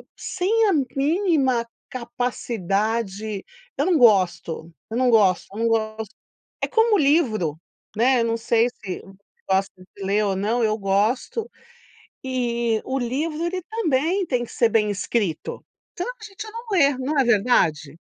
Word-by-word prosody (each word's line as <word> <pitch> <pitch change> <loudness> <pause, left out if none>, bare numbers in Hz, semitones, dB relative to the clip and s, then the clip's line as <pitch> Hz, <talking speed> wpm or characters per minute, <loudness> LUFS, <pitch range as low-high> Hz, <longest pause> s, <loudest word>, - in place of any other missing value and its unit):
e - - -33
sem 435 +5 +1
a - - +3 0.2
mínima 280 - +2 0.2
capacidade 220 -4 -2 0.3
eu 285 - +1
não 355 -4 +3
gosto, 185 -7 +2 0.2
eu 225 - -3
não 250 -1 +3
gosto, 200 -5 +4
eu 205 - -8
não 230 - +2
gosto. 220 -1 -2 0.5
É - - +1
como 450 -1 +3
o - - +3
livro, 230 - +2 0.4
né, 250 +3 +3
eu - - +1
não 230 0 0
sei 230 +1 +2
se 200 -6 -7
você 195 - -15 0.4
gosta 190 +1 +1 0.2
de 200 - -7
ler 205 +2 +1
ou 195 -1 0
não, 225 +5 0
eu 215 0 +1
gosto, 220 - 0 0.8
e 235 -3 0
o 265 +1 -2
livro 300 +7 -2
ele 365 +1 -3
também 360 -3 0
tem 250 -4 0
que - - -12
ser 235 - +3
bem 210 -1 +2
escrito. 200 -3 -2 0.3
Senão 475 +8 -3
a - - -10
gente 420 +1 -8
não 460 +2 -8
lê, 285 -8 +4
não 280 +3 -1
é - - +3
verdade? 165 - +2
235 Hz, 160 wpm, -23 LUFS, 210-290 Hz, 0.8 s, gosto